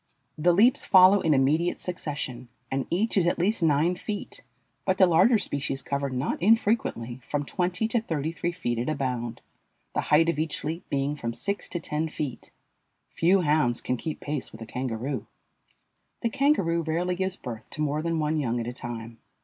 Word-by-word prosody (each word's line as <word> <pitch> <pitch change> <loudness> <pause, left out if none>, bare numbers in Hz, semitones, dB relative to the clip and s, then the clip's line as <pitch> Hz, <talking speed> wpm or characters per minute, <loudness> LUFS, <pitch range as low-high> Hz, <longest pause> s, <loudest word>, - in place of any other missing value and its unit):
The 170 +3 +3
leaps 220 +8 +4
follow 190 +1 +7
in 155 -3 +3
immediate 150 +6 +2
succession, 145 -8 -5 0.2
and 135 0 -1
each 210 +7 0
is 175 -3 +4
at 175 - +1
least 195 +4 +1
nine 160 +2 +3
feet, 205 +2 -6 0.4
but 190 -1 +1
the 190 - +7
larger 185 +7 +5
species 140 -7 -3
cover, 140 0 -2
not 130 +5 -2
infrequently, 195 - +1
from 145 -1 -1
twenty 180 +6 -1
to 235 -1 +1
thirty 160 -7 -2
three 170 +1 -2
feet 120 -10 -2
at 120 - -1
a 155 - 0
bound, 125 -4 -3 0.5
the - - 0
height 160 +2 +5
of 165 -3 0
each 155 -1 -1
leap 165 +3 -4
being 140 +1 0
from 115 -5 -4
six 200 0 -1
to 175 - -3
ten 155 0 -2
feet. 145 -5 -5 0.6
Few 185 +3 +3
hounds 150 -6 +2
can 125 - -1
keep 155 +5 -5
pace 145 -6 -4
with 110 - -12
a - - -8
kangaroo. 125 +1 -4 0.9
The 230 - +1
kangaroo 225 - +2
rarely 170 +3 -1
gives 190 +1 -1
birth 115 - -8
to 155 - -5
more 150 0 0
than 165 0 -1
one 155 0 0
young 120 -4 -1
at 115 - -3
a 120 - -4
time. 115 -2 -7
155 Hz, 190 wpm, -27 LUFS, 135-180 Hz, 0.9 s, follow